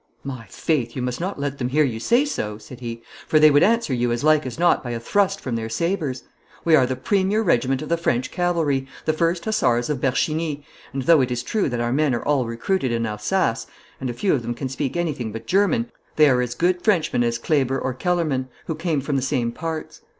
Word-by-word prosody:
'My 125 -5 -7
faith, 120 -1 -1
you 130 - -3
must 125 +3 -3
not 185 -2 -3
let 140 0 -3
them 125 -1 -1
hear 150 +4 +3
you 120 -6 -1
say 240 - +3
so,' 105 - -3
said 125 +3 -12
he, 115 -1 -6 0.2
'for 155 - +4
they 155 0 +7
would 145 +1 +5
answer 230 - +3
you 120 -1 0
as 120 +2 -1
like 155 -2 +4
as 125 - -6
not 175 +1 +3
by 125 - -5
a 120 -1 -3
thrust 195 - +1
from 125 -3 -4
their 115 0 -3
sabres. 150 -1 -2 0.4
We 165 -2 +6
are 130 -4 +4
the 130 - -2
premier 195 - +1
regiment 135 - +1
of - - -7
the 170 - +2
French 130 -6 -1
cavalry, 165 -7 0 0.2
the 155 - +2
First 170 +2 0
Hussars 150 - +1
of 135 -4 -3
Bercheny, 150 +3 0 0.3
and, 135 0 -3
though 160 +1 +6
it 130 - 0
is 125 -1 -2
true 210 -8 0
that 120 -2 -2
our 120 +1 0
men 145 -2 +2
are 120 - -4
all 140 -5 +1
recruited 130 +5 -1
in 115 0 0
Alsace, 115 - -1 0.3
and 125 -2 -3
few 195 +8 +1
of 135 - +1
them 120 +1 -4
can 130 +2 -4
speak 135 +3 -3
anything 145 -10 -2
but 115 +1 -7
German, 230 +5 +1 0.2
they 155 -1 +6
are 125 -2 +3
as 125 -1 -3
good 180 +1 +1
Frenchmen 175 - +2
as 115 0 0
Kleber 135 +1 +1
or 130 - -2
Kellermann, 150 -4 -1 0.2
who 160 - -2
came 160 -2 -1
from 140 0 -1
the - - 0
same 130 -3 0
parts. 160 +4 -5
140 Hz, 235 wpm, -22 LUFS, 125-170 Hz, 0.4 s, they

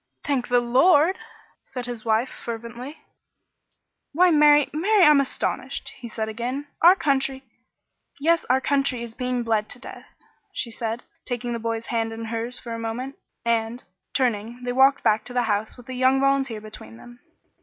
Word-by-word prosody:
"Thank 275 -5 -1
the 245 0 +4
Lord!" 290 +8 +4 0.4
said 250 -2 -6
his 240 -3 -6
wife, 225 +3 +1
fervently. 235 +5 -7 1.2
"Why, 355 +4 +5
Mary 295 -2 +6
Mary 390 +6 +3
I'm 300 -2 +7
astonished!" 275 - -3
he 240 -3 -10
said 220 0 -3
again. 245 +6 -4 0.2
"Our 350 +3 +8
country 270 -4 0 0.4
" - - -57 0.3
"Yes, 330 +3 +2
'Our 260 +1 +3
Country' 275 -3 0
is 235 -1 -8
being 250 0 -2
bled 220 -2 0
to - - -6
death," - - -11 0.5
she 235 - -3
said, 225 +1 -4 0.2
taking 245 -1 -3
the 235 - -3
boy's 230 0 -3
hand 225 -1 0
in 225 0 -6
hers 230 +2 -3
for 235 -2 -7
a 230 - -5
moment; 240 +4 -4 0.3
and, 230 +1 0 0.3
turning, 240 -1 -1
they 245 0 -2
walked 270 +2 +4
back 215 0 +3
to 245 - -9
the 245 -1 +2
house 215 0 -1
with 245 - -13
the 260 - -7
young 260 +1 +3
volunteer 270 -5 +1
between 210 - -11
them. 240 - -14
245 Hz, 175 wpm, -24 LUFS, 230-275 Hz, 1.2 s, Our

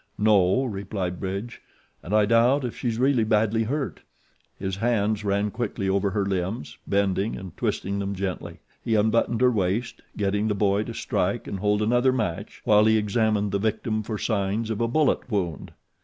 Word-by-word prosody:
"No," 105 +2 +4
replied 100 -5 -4
Bridge, 100 +5 -5 0.4
"and 85 - -9
I 105 0 +4
doubt 120 +5 +3
if 120 - -4
she's 115 -3 -2 0.3
badly 110 +1 +2
hurt." 140 +4 -3 0.6
His 95 -1 -3
hands 110 -2 0
ran 100 +1 0
quickly 110 -3 -3
over 100 +1 +1
her 100 0 -1
limbs, 95 +4 -3
bending 100 +1 +1
and 95 -3 -9
twisting 100 +1 -2
them 100 0 -3
gently; 90 -3 -5 0.2
he 115 - +1
unbuttoned 110 +2 +2
her 125 -1 +5
waist, 105 +2 -1 0.2
getting 105 +1 0
the 105 - 0
boy 100 +1 +1
to 115 - -7
strike 100 +6 -1
and 100 - -5
hold 105 +1 +1
another 120 +4 +3
match 110 -10 -3
while 105 0 +5
he 110 0 +4
examined 105 -1 +1
the 100 - 0
victim 110 +1 -1
for 110 0 -4
signs 105 +1 -1
of 110 +1 -2
a 115 - +2
bullet 140 +1 +1
wound. 90 - -2
105 Hz, 170 wpm, -25 LUFS, 100-115 Hz, 0.6 s, her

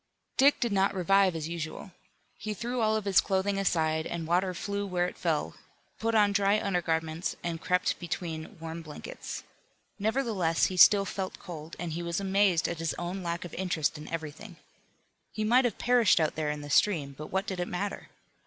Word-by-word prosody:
Dick 280 +2 +5
did 235 -3 0
not 195 0 +2
revive 195 0 +3
as 160 -1 -3
usual. 170 +3 -5 0.5
He 215 -1 -4
threw 240 +3 -2
all 220 0 +3
of 215 -2 -2
his 195 -2 +5
clothing 195 +1 0
aside 160 -4 +1
and 170 -1 -4
water 180 +2 +1
flew 200 +4 -3
where 180 -2 0
it 180 - -5
fell, 160 -4 -1 0.5
put 225 0 0
on 205 -2 +5
dry 200 +1 +3
undergarments 165 -3 -1
and 165 -1 -3
crept 180 0 +1
between 165 -2 -5
warm 165 +1 -6
blankets. 155 -2 -7 0.6
Nevertheless 215 -7 +1
he 185 - -2
still 200 +3 +7
felt 190 -1 -4
cold, 160 -2 -9
and 175 -1 -4
he 170 - -3
was 170 +1 -2
amazed 195 -3 +2
at 170 - -4
his 165 -1 -1
own 175 +2 -4
lack 170 0 -3
of 175 - -9
interest 170 -5 -1
in 150 0 -8
everything. 165 +4 -6 0.8
He 215 - -2
might 245 +4 +4
have 245 - -1
perished 240 -8 +4
out 155 -2 +1
there 155 -1 -2
in 150 0 -3
the 145 0 -7
stream, 150 -6 +2
but 150 +2 -7
what 190 +1 -1
did 190 -3 -4
it 175 - -1
matter? 200 +3 -4
180 Hz, 190 wpm, -29 LUFS, 165-200 Hz, 0.8 s, still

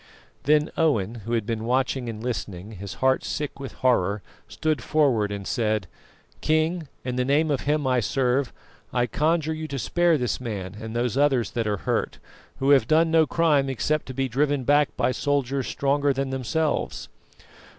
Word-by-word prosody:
Then 150 +2 +3
Owen, 115 - +2
who 115 - -3
had 115 -3 0
been 115 -1 -3
watching 130 +1 0
and 110 -1 -6
listening, 105 -5 -4
his 100 -2 -7
heart 130 0 +3
sick 150 -2 -4
with 135 -1 -7
horror, 105 -5 +2 0.2
stood 155 -5 -1
forward 125 -10 +2
and 100 -1 -5
said: 110 -4 0 0.6
"King, 160 +1 +1 0.2
in 125 -1 -2
the 125 - +2
name 145 +4 +2
of 140 - 0
Him 150 0 0
I 130 -1 +2
serve, 125 +3 0 0.4
I 120 -1 +1
conjure 160 +5 0
you 155 0 -5
to 140 -2 -4
spare 175 +4 +2
this 125 -3 -2
man 100 -6 -5
and 110 0 -6
those 120 +1 0
others 135 -5 +2
that 115 -2 -2
are 105 -1 0
hurt, - - -1 0.4
who 135 +1 +2
have 135 -6 +5
done 160 +2 +3
no 160 -1 +4
crime 150 -5 +2
except 150 +4 -1
to 130 - -7
be 135 0 0
driven 140 +2 0
back 145 +2 +4
by - - +2
soldiers 140 0 -1
stronger 140 0 +1
than 135 0 -2
themselves." 135 +4 -1
135 Hz, 180 wpm, -25 LUFS, 115-150 Hz, 0.6 s, have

